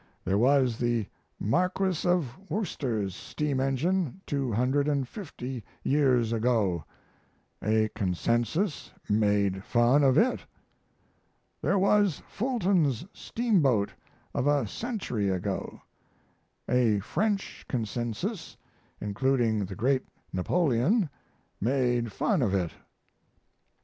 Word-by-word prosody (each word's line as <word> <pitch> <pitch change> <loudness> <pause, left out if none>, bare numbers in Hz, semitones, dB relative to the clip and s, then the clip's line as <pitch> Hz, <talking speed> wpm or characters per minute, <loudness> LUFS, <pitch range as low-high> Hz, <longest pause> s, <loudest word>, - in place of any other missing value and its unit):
There 95 +2 +2
was 130 -2 +3
the 120 -3 +1 0.3
Marquis 180 - +1
of 160 -9 +1
Worcester's 120 - -2
steam 145 +3 -2
engine 150 +5 0
250 135 - -1 0.2
years 130 -5 +3
ago: 110 - +1 0.8
a 110 +1 +3
Consensus 120 - -1
made 100 -2 +2
fun 120 +5 +3
of 135 0 +4
it. 250 +9 +3 1.2
There 200 - +2
was 200 -2 +3
Fulton's 190 - +1
steamboat 155 - +1 0.4
of 135 - 0
a 145 -4 +3
century 125 - -2
ago: 95 +1 -3 0.8
a 120 -4 +3
French 195 - -1
Consensus, 120 - -3 0.4
including 110 0 +1
the 95 0 -7
great 130 +5 +1 0.3
Napoleon, 155 - +2 0.5
made 120 -1 +1
fun 190 - +1
of 100 -5 +1
it. 90 -4 0
130 Hz, 90 wpm, -28 LUFS, 110-165 Hz, 1.2 s, of